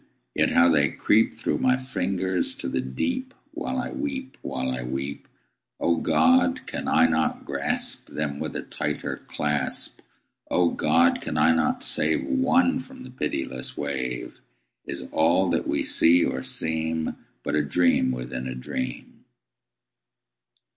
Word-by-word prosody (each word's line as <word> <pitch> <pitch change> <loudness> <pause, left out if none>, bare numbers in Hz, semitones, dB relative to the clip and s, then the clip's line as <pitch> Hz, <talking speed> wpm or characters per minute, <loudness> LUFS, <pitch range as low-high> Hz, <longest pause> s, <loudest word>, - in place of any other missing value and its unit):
yet - - +2
how 85 - +5
they 75 -4 +4
creep 110 +10 +3
Through - - -1
my 130 0 +3
fingers 95 -7 -1
to - - -4
the 65 - -1
deep 255 - -3 0.2
While 265 - -4
I 250 - -2
weep 270 -2 -4
while 65 -1 -3
I 65 0 -3
weep! 65 +3 -5 0.5
O 85 0 +2
God! 260 - +3
can - - -5
I - - +5
not 80 -1 0
grasp - - -1
Them 75 -2 -3
with - - -4
a - - -3
tighter 75 0 -3
clasp? 75 -1 -2 0.5
O 90 -1 +3
God! 85 +1 +3
can 75 - -3
I 80 +2 +5
not 80 - +1
save 80 +1 +2
One 265 -1 +2
from 130 - -10
the 130 - -10
pitiless 65 - -4
wave? 65 -4 -4 0.4
Is - - -5
all 85 +3 +3
that 85 - 0
we - - 0
see 85 +1 +5
or 65 - -2
seem 80 +2 -2 0.3
But - - -3
a 75 -1 +2
dream 85 -2 +2
within 60 0 -4
a 65 - -4
dream? 65 0 -6
80 Hz, 145 wpm, -25 LUFS, 70-110 Hz, 0.5 s, how